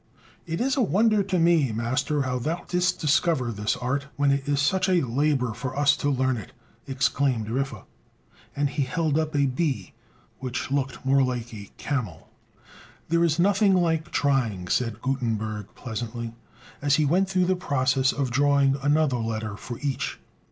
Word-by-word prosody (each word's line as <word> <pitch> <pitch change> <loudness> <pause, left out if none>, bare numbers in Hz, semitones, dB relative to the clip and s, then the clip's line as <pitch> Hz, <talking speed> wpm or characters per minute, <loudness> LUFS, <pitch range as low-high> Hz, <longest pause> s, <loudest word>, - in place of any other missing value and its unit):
"It 165 0 -3
is 265 +2 +1
a 275 - +1
wonder 215 +1 +3
to 190 -1 -1
me, 165 -6 +3
master, 130 +6 0
how 125 -1 -2
thou 160 +7 -3
didst 180 0 +1
discover 150 -4 +2
this 105 0 -1
art, 140 +3 -2
when 145 -1 +2
it 140 0 -1
is 140 -1 +1
such 185 +6 +2
a 175 -6 +3
labor 130 -1 +1
for 125 +4 -5
us 145 0 +4
to 145 - 0
learn 130 -2 +1
it!" 105 - -9 0.3
exclaimed 130 -4 0
Riffe; 130 -3 -3 0.7
and 145 0 0
he 145 - -1
held 150 +3 0
up 155 -1 -2
a 140 -1 +3
B 130 - -2 0.5
which 130 0 -4
looked 135 -2 -2
more 135 +1 +4
like 125 -2 -2
a 100 -2 -9
camel. 110 - -4 0.8
"There's 170 -1 +2
nothing 195 +2 +4
like 165 -2 +1
trying," 115 -11 0
said 115 0 -1
Gutenberg 110 -6 -2
pleasantly, 115 0 -5 0.5
as 145 0 +3
he 155 - +2
went 185 +6 +2
through 185 -1 +2
the 185 +1 +2
process 135 -5 +1
of 135 -3 -2
drawing 140 0 +3
another 145 -2 +2
letter 110 -2 -3
for 120 +3 -7
each. 140 -2 -2
140 Hz, 165 wpm, -25 LUFS, 125-155 Hz, 0.8 s, us